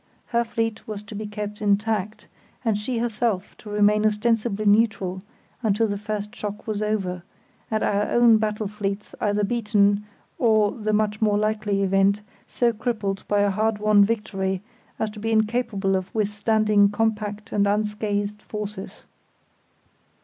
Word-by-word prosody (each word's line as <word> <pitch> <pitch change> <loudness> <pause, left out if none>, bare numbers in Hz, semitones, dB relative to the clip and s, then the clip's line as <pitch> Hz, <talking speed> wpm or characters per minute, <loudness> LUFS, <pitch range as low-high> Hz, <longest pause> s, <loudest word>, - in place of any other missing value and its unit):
Her 235 0 +2
fleet 225 -1 -3
was 210 -1 -5
to 210 - -11
be 210 +1 -5
kept 210 0 -6
intact, 210 0 0 0.4
and 220 -2 +2
she 225 +4 -2
herself 225 -4 -1
to 215 - -11
remain 210 0 +3
ostensibly 215 0 +1
neutral 205 -3 +2 0.4
until 220 -1 +2
the 205 -2 -1
first 210 0 -4
shock 210 0 -6
was 215 -2 -2
over, 195 -4 -1 0.5
and 220 -1 0
our 205 +1 +1
own 240 -2 +6
battle 215 -1 -1
fleets 200 0 -4
either 210 0 +1
beaten, 205 -2 +2 0.4
or, 215 -3 +4
the 215 -2 -2
much 210 0 0
more 210 -1 +3
likely 210 -1 0
event, 195 +2 +2 0.2
so 240 -1 +1
crippled 215 -4 -2
by 205 0 +2
a 205 -1 +3
hard 215 +2 +1
won 210 -1 +5
victory 195 -3 -1 0.3
as 220 -1 -2
to 210 - -10
be 225 +2 -2
incapable 220 -3 +1
of 185 +2 -4
withstanding 210 -1 +3
compact 210 +1 -2
and 200 -1 +2
unscathed 210 0 -1
forces. 210 -2 -7
210 Hz, 150 wpm, -24 LUFS, 205-220 Hz, 0.5 s, own